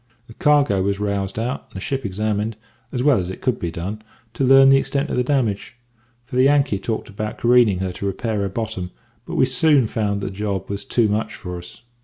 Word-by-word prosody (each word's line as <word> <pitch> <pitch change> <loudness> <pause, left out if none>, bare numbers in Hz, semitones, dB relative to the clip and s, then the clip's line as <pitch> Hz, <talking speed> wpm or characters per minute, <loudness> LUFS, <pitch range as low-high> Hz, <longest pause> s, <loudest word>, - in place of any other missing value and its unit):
"The 115 - -14
cargo 145 -8 +3
was 100 +1 -1
roused 100 -1 -2
out, 120 +4 -3
and - - -25
the - - -4
ship 130 +3 -2
examined, 105 +2 -2 0.3
as 125 - -2
well 145 -6 +4
as 90 -1 -3
it 95 - -7
could 125 -4 -1
be 85 - -2
done, 95 +6 -5 0.3
to 125 - -2
learn 135 +1 +7
the 135 - +7
extent 140 +2 -1
of - - -1
the 125 - +2
damage, 120 -5 -1 0.5
for 125 - -5
the - - +5
Yankee 135 -6 +3
talked 110 +3 -3
about 105 +1 -5
careening 120 -5 +4
her 95 -1 -2
to 100 +2 -4
repair 110 +3 -2
her 100 -1 -1
bottom; 105 -3 -4 0.4
but - - -5
we - - +4
soon 135 +1 +3
found 105 -2 -1
that - - -3
the - - -3
job 100 -1 -3
was 100 +5 -4
too 120 -4 +2
much 105 +2 -2
for 90 -1 -7
us. 90 +5 -13
110 Hz, 230 wpm, -21 LUFS, 100-125 Hz, 0.5 s, learn